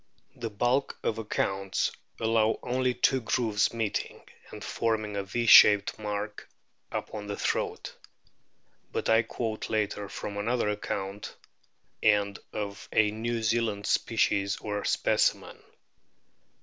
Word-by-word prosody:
The 115 - -4
bulk 120 +6 0
of 110 - -1
accounts 95 -3 -1 0.3
allow 110 -1 +2
only 125 0 0
two 130 +1 +2
grooves 110 -3 +1
meeting, 115 -3 -3 0.3
and - - -9
forming 110 -2 -1
a 100 - 0
V 120 +5 -2
shaped 105 -2 +7
mark 105 0 -5 0.4
upon 105 -1 -5
the 100 - -4
throat. - - -2 1.0
But - - -2
I 110 0 +6
quote 115 -1 -4
later 105 -2 -1
from 100 -1 -6
another 115 +1 0
account, 100 -1 -4 0.7
and 100 -2 +2
of 100 -1 -5
a 105 -1 +3
New 115 +1 -3
Zealand 110 -2 0
species 100 -3 +1
or 105 -1 -4
specimen. - - +1
110 Hz, 120 wpm, -28 LUFS, 105-115 Hz, 1.0 s, shaped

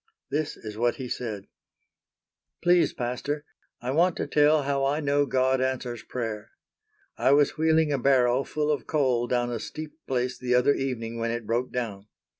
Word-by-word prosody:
This 150 +1 -1
is 110 -1 -8
what 120 0 +2
he 130 - -6
said: 110 -5 -4 1.2
"Please, 175 0 +4
Pastor, 140 +4 -3 0.4
I 125 - -2
want 170 +5 +3
to - - -1
tell 150 0 +4
how 140 0 0
I 140 +2 +1
know 145 -1 +1
God 130 0 +2
answers 130 -2 -2
prayer. 110 -3 -5 0.6
I 135 - +4
was 145 0 +3
wheeling 160 -1 +3
a 140 - 0
barrow 130 -1 +3
full 150 +1 -1
of 145 -5 -2
coal 130 -6 +1
down 120 -1 0
a 115 - -2
steep 155 +5 -7
place 125 -1 -1
the 125 -1 +1
other 125 +3 +4
evening 115 -4 -3
when 115 0 -1
it 120 -1 -3
broke 120 +3 -1
down. 105 -5 -4
130 Hz, 175 wpm, -26 LUFS, 120-145 Hz, 1.2 s, Please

